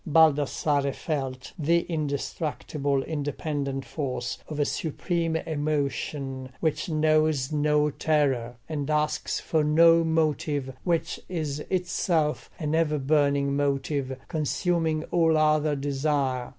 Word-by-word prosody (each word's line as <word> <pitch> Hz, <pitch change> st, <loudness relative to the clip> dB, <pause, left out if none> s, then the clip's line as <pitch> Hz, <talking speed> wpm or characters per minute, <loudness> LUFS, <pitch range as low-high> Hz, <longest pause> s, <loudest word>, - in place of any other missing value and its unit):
Baldassarre 145 Hz, -2 st, +3 dB
felt 135 Hz, -5 st, -4 dB
the 170 Hz, +3 st, +3 dB
indestructible 145 Hz, -2 st, -2 dB
independent 145 Hz, -2 st, -3 dB
force 125 Hz, -5 st, -3 dB
of 150 Hz, -1 st, -5 dB
a 145 Hz, -, +3 dB
supreme 165 Hz, +2 st, -1 dB
emotion, 145 Hz, -3 st, -2 dB
which 155 Hz, 0 st, -1 dB
knows 155 Hz, -3 st, +2 dB
no 150 Hz, 0 st, +2 dB
terror, 135 Hz, -7 st, +1 dB
and 150 Hz, -2 st, -3 dB
asks 150 Hz, 0 st, 0 dB
for 160 Hz, -2 st, 0 dB
no 165 Hz, +2 st, +6 dB
motive, 150 Hz, -4 st, 0 dB
which 170 Hz, -3 st, 0 dB
is 155 Hz, -5 st, -2 dB
itself 175 Hz, -4 st, 0 dB
an 155 Hz, -2 st, -2 dB
ever 160 Hz, -2 st, +2 dB
burning 140 Hz, -1 st, +2 dB
motive, 140 Hz, -1 st, -1 dB
consuming 160 Hz, 0 st, 0 dB
all 165 Hz, -2 st, +3 dB
other 155 Hz, -1 st, +3 dB
desire. 135 Hz, -2 st, -1 dB
150 Hz, 110 wpm, -26 LUFS, 140-160 Hz, -, no